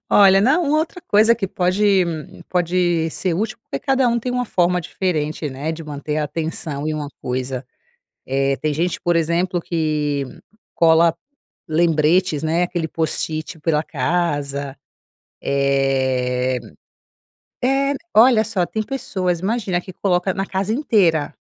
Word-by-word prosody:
Olha, 195 Hz, -1 st, +6 dB
não, 300 Hz, -, +3 dB
uma 300 Hz, +2 st, +2 dB
outra 335 Hz, +3 st, -3 dB
coisa 215 Hz, +3 st, +5 dB
que 200 Hz, -4 st, -3 dB
pode 185 Hz, +1 st, 0 dB, 0.6 s
pode 175 Hz, -2 st, +1 dB
ser 180 Hz, 0 st, -2 dB
útil, 215 Hz, +5 st, -2 dB
porque 140 Hz, -, -5 dB
cada 265 Hz, -, +2 dB
um 235 Hz, 0 st, +1 dB
tem 250 Hz, +2 st, -3 dB
uma 250 Hz, 0 st, 0 dB
forma 180 Hz, -4 st, +1 dB
diferente, 155 Hz, -4 st, -2 dB
né, 140 Hz, +4 st, -4 dB
de 160 Hz, 0 st, -6 dB
manter 150 Hz, 0 st, -4 dB
a 150 Hz, -, 0 dB
atenção 155 Hz, -1 st, -4 dB
em 155 Hz, -, -1 dB
uma 150 Hz, -2 st, -4 dB
coisa, 130 Hz, +1 st, -3 dB, 0.6 s
eh, 135 Hz, +1 st, +1 dB
tem 155 Hz, -1 st, -2 dB
gente, 175 Hz, +3 st, -1 dB
por 175 Hz, 0 st, +1 dB
exemplo, 170 Hz, +2 st, +1 dB
que 150 Hz, -4 st, -1 dB, 0.5 s
cola 165 Hz, 0 st, +4 dB, 0.5 s
lembretes, 160 Hz, 0 st, +2 dB
né, 165 Hz, +3 st, +1 dB
aquele 175 Hz, -2 st, -3 dB
post-it 160 Hz, +1 st, -3 dB
pela 150 Hz, -1 st, +1 dB
casa, 140 Hz, -2 st, -2 dB, 0.7 s
eh. 130 Hz, -2 st, +1 dB, 1.0 s
É, 275 Hz, +2 st, +2 dB, 0.2 s
olha 230 Hz, 0 st, +7 dB
só, 200 Hz, -5 st, 0 dB
tem 220 Hz, -, -3 dB
pessoas, 185 Hz, -8 st, -2 dB
imagina, 195 Hz, -4 st, -1 dB
que 185 Hz, -, -10 dB
coloca 180 Hz, -1 st, 0 dB
na 195 Hz, -1 st, -2 dB
casa 195 Hz, +3 st, -2 dB
inteira. 190 Hz, -, +2 dB
170 Hz, 140 wpm, -20 LUFS, 150-195 Hz, 1.0 s, olha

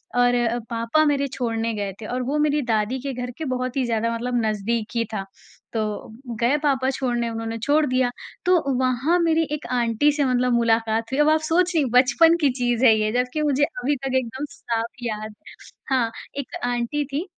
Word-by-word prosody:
और 245 Hz, 0 st, +4 dB
अ, 240 Hz, 0 st, +1 dB
पापा 230 Hz, +7 st, +1 dB
मेरे 280 Hz, -1 st, +1 dB
छोड़ने 230 Hz, -3 st, -1 dB
गए 200 Hz, -2 st, -3 dB
थे -, -, -6 dB
और 250 Hz, +3 st, -3 dB
वो 300 Hz, -, +1 dB
मेरी 300 Hz, 0 st, +2 dB
दादी 220 Hz, +4 st, 0 dB
के 270 Hz, -, -2 dB
घर 250 Hz, 0 st, -4 dB
के 320 Hz, -, -4 dB
बहुत 255 Hz, +1 st, -3 dB
ही 260 Hz, -, +1 dB
ज़्यादा 230 Hz, 0 st, 0 dB
मतलब 245 Hz, +1 st, -1 dB
नज़दीक 215 Hz, +1 st, -1 dB
ही 230 Hz, -1 st, +1 dB
था 195 Hz, -2 st, -3 dB, 0.5 s
तो 225 Hz, -, 0 dB, 0.6 s
गए 245 Hz, +4 st, +3 dB
पापा 265 Hz, -3 st, +2 dB
छोड़ने 245 Hz, -3 st, -1 dB
उन्होंने 225 Hz, 0 st, -4 dB
छोड़ 300 Hz, +3 st, +3 dB
दिया। 255 Hz, -2 st, +1 dB, 0.4 s
तो 345 Hz, -7 st, +3 dB
वहाँ 260 Hz, +6 st, +2 dB
मेरी 325 Hz, -1 st, +3 dB
एक 300 Hz, 0 st, -3 dB
आंटी 235 Hz, +5 st, +2 dB
से 290 Hz, -1 st, 0 dB
मतलब 250 Hz, -1 st, +2 dB
मुलाकात 225 Hz, -1 st, +1 dB
हुई, 265 Hz, -, -1 dB
अब 295 Hz, +1 st, +5 dB
आप 310 Hz, 0 st, +4 dB
सोच 340 Hz, +3 st, +2 dB
रही 320 Hz, -3 st, +3 dB
हैं 260 Hz, -, -2 dB
बचपन 275 Hz, +7 st, +5 dB
की 290 Hz, -, +4 dB
चीज़ 245 Hz, 0 st, +1 dB
है 225 Hz, -3 st, +7 dB
ये 215 Hz, 0 st, +1 dB
जबकि 250 Hz, +5 st, 0 dB
मुझे 290 Hz, -1 st, +2 dB
अभी 290 Hz, 0 st, 0 dB
तक 265 Hz, -1 st, -3 dB
एकदम 260 Hz, +3 st, -3 dB
साफ 230 Hz, -4 st, -3 dB, 0.2 s
याद 215 Hz, -2 st, -4 dB, 0.5 s
हाँ, 250 Hz, -4 st, +1 dB, 0.3 s
एक 280 Hz, -, -5 dB
आंटी 245 Hz, +4 st, -1 dB
थी 285 Hz, +5 st, -3 dB
250 Hz, 200 wpm, -23 LUFS, 230-285 Hz, 0.6 s, है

